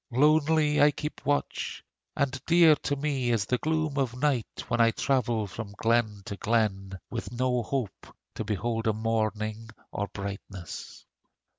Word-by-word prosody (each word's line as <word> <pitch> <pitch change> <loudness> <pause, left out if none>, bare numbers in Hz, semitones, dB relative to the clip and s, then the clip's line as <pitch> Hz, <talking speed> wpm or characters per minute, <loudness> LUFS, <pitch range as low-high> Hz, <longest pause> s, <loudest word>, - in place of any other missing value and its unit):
Lonely 150 +3 +4
I 145 - +8
keep 150 +1 -5
watch, 145 0 -1 0.3
And 135 -1 -1
dear 170 -2 +7
to 145 - -2
me 140 -3 -1
is 115 -4 +2
the 125 +3 0
gloom 155 -2 0
of 125 -3 -1
night 135 -5 0
When 120 -1 +1
I 115 - +6
travel 120 -3 +1
from 100 +1 -7
glen 110 -3 +1
to 100 - -5
glen, 95 -4 0
With 115 - -4
no 125 0 +1
hope 125 -1 -3 0.3
to - - -4
behold 115 +2 -1
a 110 - +3
morning 110 0 -1 0.2
or 100 - -2
brightness. 100 -2 -7
120 Hz, 150 wpm, -28 LUFS, 110-140 Hz, 0.3 s, I